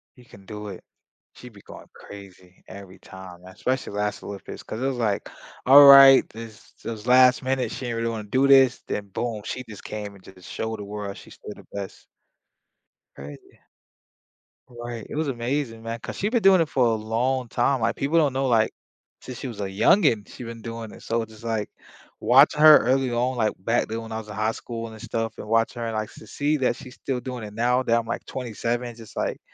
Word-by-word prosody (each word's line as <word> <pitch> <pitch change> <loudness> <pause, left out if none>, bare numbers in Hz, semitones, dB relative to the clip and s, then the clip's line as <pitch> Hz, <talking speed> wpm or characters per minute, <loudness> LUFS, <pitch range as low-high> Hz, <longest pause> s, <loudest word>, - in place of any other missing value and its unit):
You 125 - -18
can 100 -4 -17
do 105 +1 -8
it. 95 - -10 0.5
She'd 125 -2 -13
be 100 - -16
going - - -12
crazy 95 -2 -14
every 95 -1 -12
time, 95 -2 -12
especially 125 +7 -3
last 105 0 -3
Olympics 100 -1 -9
'cause 110 - -7
it 135 - 0
was, 135 -2 -2
like, 110 -4 -1 0.4
all 140 +2 +10
right, 135 -1 +9
this 110 -1 -12
this - - -4
was 110 0 -9
last 125 0 +5
minute, 130 0 -1
she 130 - -6
didn't 120 -1 -3
really 115 0 -1
wanna 110 -2 -5
do 130 +4 +2
this, 135 -2 +5
then 105 -1 -4
boom, 115 +1 -4
she 130 - -5
just 105 - -11
came 105 -1 -7
and 95 - -18
just 90 -2 -14
showed 110 -1 -4
the - - -6
world 100 -1 -6
she's - - -14
still - - -10
the - - -16
best. 100 -1 -8 1.1
Crazy. 70 +1 -12 1.1
Right, 120 -2 -8
it - - -7
was 155 -1 -1
amazing, 120 -1 -3
man, 115 +1 -5
'cause - - -7
she's 205 - -1
been 235 0 +1
doing 190 -1 +6
it 165 - +2
for 130 -4 +2
a 115 - +2
long 120 +4 -1
time. 130 +4 0
Like, 110 - 0
people 145 +5 0
don't 150 -5 +3
know, 135 0 0
like, 115 -3 +2 0.5
since 125 -1 -9
she 135 - -5
was 110 -4 -7
a - - -1
youngin, 110 - +3
she's 125 - -10
been 115 0 -8
doing 115 -1 -7
it. - - -14
So 115 0 -1
it's 110 -1 -8
just, 110 +1 -15
like, 110 -2 -2 0.5
watching 140 +4 +5
her 155 -1 +10
early 130 +1 +1
on, 125 +2 -1
like, 110 -2 +1
back 115 +6 0
then 115 +1 -4
when 115 0 -10
I 110 - -3
was 110 -1 -8
in 105 - -8
high 110 +1 0
school 115 0 -7
and 110 -1 -12
stuff 115 -1 -3
and - - -8
watching 115 +2 +1
her 115 - -2
and, 115 - -4
like, 110 -1 -3
to 110 - -14
see 145 +6 -1
that 130 -3 0
she's 130 -2 -12
still 130 -2 -4
doing 125 -3 -6
it 105 - -10
now 120 +3 +1
that 115 -2 +2
I'm, 115 - -2
like, 115 - -5
27, 120 0 -4
just, 115 -3 -13
like, - - -2
115 Hz, 225 wpm, -24 LUFS, 105-130 Hz, 1.1 s, all